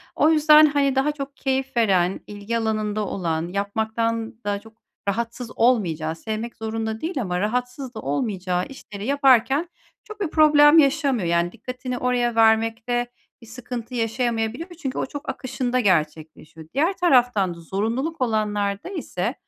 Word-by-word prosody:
O 305 - +4
yüzden 305 -1 +7
hani 280 -2 +1
daha 270 +3 +2
çok 280 -1 -7
keyif 265 -1 -2
veren, 190 -5 +2
ilgi 205 +3 -4
alanında 215 -2 -1
olan, 165 -4 -2
yapmaktan 220 +4 -2
da 205 -1 -1
çok 220 +2 -19 0.3
rahatsız 235 +3 -3
olmayacağı, 170 -10 +1
sevmek 220 +6 -5
zorunda 220 0 -4
değil 320 -4 -2
ama 180 -4 -2
rahatsız 250 +5 -2
da 220 - -7
olmayacağı 180 - -2
işleri 215 -6 -9
yaparken 275 +3 +3 0.3
çok 425 -1 -11
bir 390 - +1
problem 300 0 +6
yaşamıyor. 275 - +2
Yani 170 +1 +1
dikkatini 250 +3 -6
oraya 245 -1 0
vermekte 225 +2 +2 0.3
bir 230 - -14
sıkıntı 245 0 -7
yaşayamayabiliyor 235 +5 -1
çünkü 265 -3 -3
o - - 0
çok 285 +2 -8
akışında 255 -1 -2
gerçekleşiyor. 160 -4 -1
Diğer 320 +9 +2
taraftan 245 - +3
da - - -12
zorunluluk 230 - -3
olanlarda 210 - -1
ise 395 - -3
230 Hz, 140 wpm, -23 LUFS, 205-265 Hz, 0.3 s, yüzden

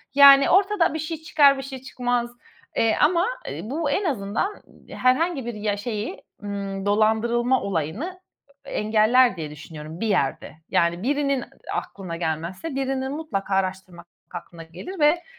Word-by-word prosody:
Yani 275 -1 +9
ortada 380 -3 +3
bir 315 - -3
şey 315 +2 -4
çıkar, 295 -4 +5
bir 270 - -5
şey 265 -1 -8
çıkmaz, 245 -2 -1 0.5
eee, 225 -1 +3
ama, 340 +3 +4 0.2
eee, - - -5
bu 290 +6 -2
en 390 +8 0
azından 250 - -1 0.4
ı - - -10
herhangi 270 +2 +1
bir 240 - -4
ya 210 -1 -2
şeyi, 215 -1 -4 0.2
ımm, 200 -1 -4
dolandırılma 225 +4 +2
olayını 200 - -3 0.5
ö - - -10
engeller 220 +2 +3
diye 155 -2 -5
düşünüyorum, 155 +2 -9
bir 225 - -1
yerde. 180 -10 0 0.2
Yani 170 +3 +1
birinin 280 -1 +1
ı - - -10 0.2
aklına 185 -4 -5
gelmezse 170 - -3
birinin 270 0 -1
mutlaka 205 -11 -3
araştırmak 185 -2 -3 0.3
aklına 170 -2 -8
gelir 185 - -9
ve, 305 +4 +4
240 Hz, 150 wpm, -24 LUFS, 195-285 Hz, 0.5 s, Yani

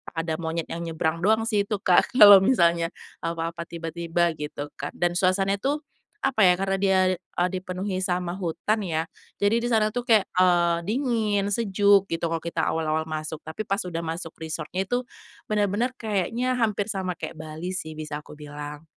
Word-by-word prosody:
ada 165 -1 -2
monyet 165 0 -2
yang 165 - -4
nyebrang 160 0 -1
doang 220 +5 +3
sih 205 -1 +1
itu 210 - 0
Kak, 180 +6 +4
kalau 205 -5 +11
misalnya 170 -6 +3 0.3
apa-apa, 165 0 -4
tiba-tiba 170 +1 -1
gitu 145 -1 -5
kan, - - -4
dan 175 0 +1
suasananya 195 +2 +1
itu 275 - 0 0.5
apa 265 -5 +1
ya, 180 - +7
karena 195 0 0
dia, 190 -1 +3 0.2
eee, 180 0 -2
dipenuhi 185 +1 -3
sama 180 -2 -1
hutan 195 +4 -1
ya, 160 -3 -1 0.4
jadi 205 +3 +3
di - - 0
sana 215 -2 +3
tuh 245 - -1
kayak, 220 -4 +5 0.2
eee, 175 -2 +4
dingin, 220 -5 0
sejuk, 200 -2 +3
gitu, 165 0 -2
kalau 165 - 0
kita 170 -1 -2
awal-awal 160 -1 0
masuk. 155 0 -4
Tapi 160 +7 -5
pas 195 +1 0
udah 165 -1 -3
masuk 165 0 -5
resort-nya 160 +4 -4
itu 245 +3 0 0.5
benar-benar 210 +4 +1
kayaknya 225 +4 -1
hampir 210 -3 +1
sama 190 -2 -2
kayak - - -6
Bali 160 +3 -6
sih 160 -3 -5
bisa 150 -1 -5
aku - - -13
bilang. 150 +1 -8
180 Hz, 175 wpm, -25 LUFS, 165-205 Hz, 0.5 s, kalau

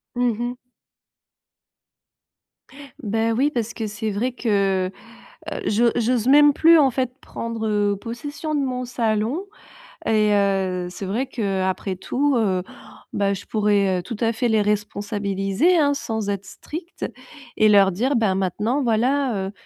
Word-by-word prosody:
Mmh 245 -1 +2
mh. 245 +1 -2 2.5
Bah, 225 +2 0
oui, 280 +6 +2
parce 235 -3 -2
que 220 -2 -4
c'est 210 +1 -3
vrai 240 +6 -1
que, 195 -6 0 0.6
heu, - - -4
j'o 235 +3 +3
j'ose 240 0 +1
même 290 +1 +7
plus, 330 +2 +6
en 270 -3 +4
fait, 255 0 -1
prendre, 230 -1 -4
heu, 205 -1 +1
possession 290 +8 -5
de 285 - +1
mon 250 -1 -2
salon 235 - -1 0.6
et 215 -1 +3
heu, 190 -3 +1
c'est 190 +1 -6
vrai 235 +8 -1
qu'après 190 -4 -2
tout, 275 +8 0
heu, 190 -5 +1 0.5
bah, 200 0 +1
je 200 - -8
pourrais, 205 -3 +2
heu, - - -9
tout 230 +4 -6
à 230 0 +2
fait, 240 +1 0
les 220 -2 +3
responsabiliser, 205 - 0
hein, 285 -2 +3
sans 220 -6 -3
être 200 0 -3
stricte 330 - -7 0.5
et 215 -1 +5
leur 200 -2 +5
dire: 250 +8 0
«Ben 215 -5 +2
maintenant, 210 +9 0
voilà, 240 -2 +1
heu - - -8
220 Hz, 150 wpm, -22 LUFS, 200-250 Hz, 2.5 s, même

